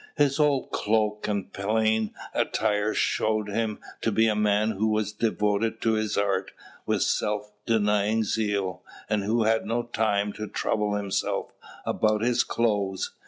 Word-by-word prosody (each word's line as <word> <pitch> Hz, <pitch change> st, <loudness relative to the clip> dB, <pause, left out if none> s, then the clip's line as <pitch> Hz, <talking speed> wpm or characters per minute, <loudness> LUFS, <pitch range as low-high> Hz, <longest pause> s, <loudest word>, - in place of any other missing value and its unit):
His 145 Hz, 0 st, +2 dB
old 145 Hz, -3 st, +2 dB
cloak 105 Hz, 0 st, 0 dB
and 100 Hz, -2 st, -2 dB
plain 110 Hz, +1 st, +1 dB, 0.2 s
attire 105 Hz, -1 st, +1 dB
showed 110 Hz, -1 st, +1 dB
him 110 Hz, 0 st, -1 dB, 0.2 s
to 115 Hz, -, +1 dB
be 110 Hz, +2 st, +3 dB
a 110 Hz, -, +2 dB
man 105 Hz, +1 st, +2 dB
who 110 Hz, +1 st, 0 dB
was 110 Hz, -1 st, 0 dB
devoted 105 Hz, 0 st, 0 dB
to 115 Hz, -, +2 dB
his 110 Hz, -1 st, -1 dB
art 100 Hz, -2 st, 0 dB, 0.4 s
with -, -, +2 dB
self 105 Hz, 0 st, -1 dB, 0.2 s
denying 105 Hz, 0 st, +2 dB
zeal, 100 Hz, -3 st, -1 dB, 0.3 s
and 105 Hz, -2 st, +1 dB
who 110 Hz, +3 st, +1 dB
had 110 Hz, +1 st, +1 dB
no 120 Hz, +2 st, 0 dB
time 105 Hz, -3 st, 0 dB
to 110 Hz, -, -5 dB
trouble 105 Hz, 0 st, -1 dB
himself 100 Hz, -2 st, -2 dB, 0.3 s
about 110 Hz, -1 st, +1 dB
his 120 Hz, 0 st, +3 dB
clothes. 100 Hz, -5 st, 0 dB
105 Hz, 150 wpm, -26 LUFS, 105-110 Hz, 0.4 s, be